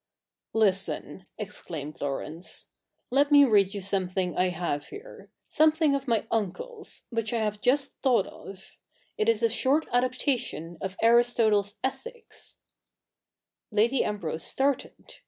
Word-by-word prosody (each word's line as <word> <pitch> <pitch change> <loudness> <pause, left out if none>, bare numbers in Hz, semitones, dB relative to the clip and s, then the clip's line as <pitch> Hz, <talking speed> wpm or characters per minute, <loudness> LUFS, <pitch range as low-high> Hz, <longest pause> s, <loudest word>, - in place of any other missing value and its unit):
'Listen,' 195 -3 0
exclaimed 160 -9 -7
Laurence; 150 +5 -5 0.4
'let 285 +3 +3
me 285 -1 +8
read 205 -4 +3
you 200 - -4
some 190 -1 -1
thing 185 -1 -2
I 185 - +2
have 170 -4 -2
here 420 +5 -11
— - - -48
something 310 -1 +5
of 275 0 -2
my 230 -3 +1
uncle's, 320 - -3
which 230 -2 -1
I - - +1
have 210 -1 -2
just 275 +2 +1
thought 245 -8 +3
of. 190 -1 -12 0.4
It 435 +1 +3
is 460 - +1
a - - +6
short 290 0 +2
adaptation 245 - -1
of 190 0 -4
Aristotle's 225 -3 +4
Ethics: 450 - -6 1.1
Lady 230 +5 +2
Ambrose 170 -6 -3
started. 275 0 -2
220 Hz, 135 wpm, -27 LUFS, 190-275 Hz, 1.1 s, me